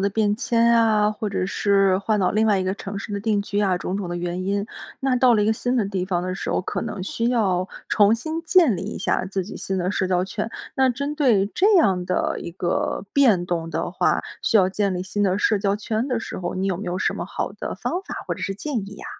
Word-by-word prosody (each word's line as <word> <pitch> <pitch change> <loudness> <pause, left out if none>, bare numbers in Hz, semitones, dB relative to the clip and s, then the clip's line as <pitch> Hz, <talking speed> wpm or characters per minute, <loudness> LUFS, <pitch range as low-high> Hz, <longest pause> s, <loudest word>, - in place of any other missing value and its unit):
的 200 - +2
变 205 0 +1
迁 235 -1 +2
啊， 215 -2 +4
或 215 0 -4
者 190 -2 -1
是 195 -1 +2
换 210 +1 0
到 185 - +2
另 220 +1 +2
外 205 -2 +3
一 185 - -1
个 185 - 0
城 200 0 -6
市 205 - -7
的 200 - -2
定 210 -1 +1
居 205 0 -2
啊， 190 -3 +2
种 180 +2 -3
种 200 -3 -4
的 175 - -3
原 175 +1 -3
因。 200 +1 0 0.4
那 265 -1 +1
到 245 -1 +5
了 210 - +3
一 205 - +1
个 220 - +4
新 245 +3 -1
的 230 - +2
地 195 -2 -2
方 180 -2 -1
的 185 0 -3
时 - - -5
候， - - +1
可 - - -3
能 195 - -5
需 230 +5 -1
要 190 -6 +1 0.2
重 210 +1 +5
新 315 +8 -4
建 330 - +4
立 170 - -5
一 - - -5
下 - - 0
自 190 -1 -2
己 200 - -8
新 190 - -3
的 180 0 0
社 195 -2 0
交 180 0 +1
圈。 210 +3 -4 0.3
那 265 -1 +4
针 280 +4 -2
对 240 -10 +3
这 395 - +3
样 190 - +3
的 185 - 0
一 - - -6
个 180 +2 -2
变 225 -11 +4
动 170 -2 -2
的 - - -3
话， - - +1 0.2
需 225 - +3
要 185 -3 +5
建 200 0 0
立 180 - -2
新 205 +2 -2
的 190 -1 +2
社 210 0 +2
交 200 0 +1
圈 220 +3 -2
的 250 -3 0
时 - - -6
候， 175 -1 -4
你 190 +1 -1
有 190 -2 0
没 200 - -6
有 175 - -2
什 - - +1
么 - - -4
好 - - -4
的 - - -5
方 360 - -3
法 - - -7
或 - - -1
者 - - -11
是 195 - -2
建 275 +5 -3
议 205 - -10
呀？ - - -11
200 Hz, 290 characters per minute, -23 LUFS, 185-225 Hz, 0.4 s, 到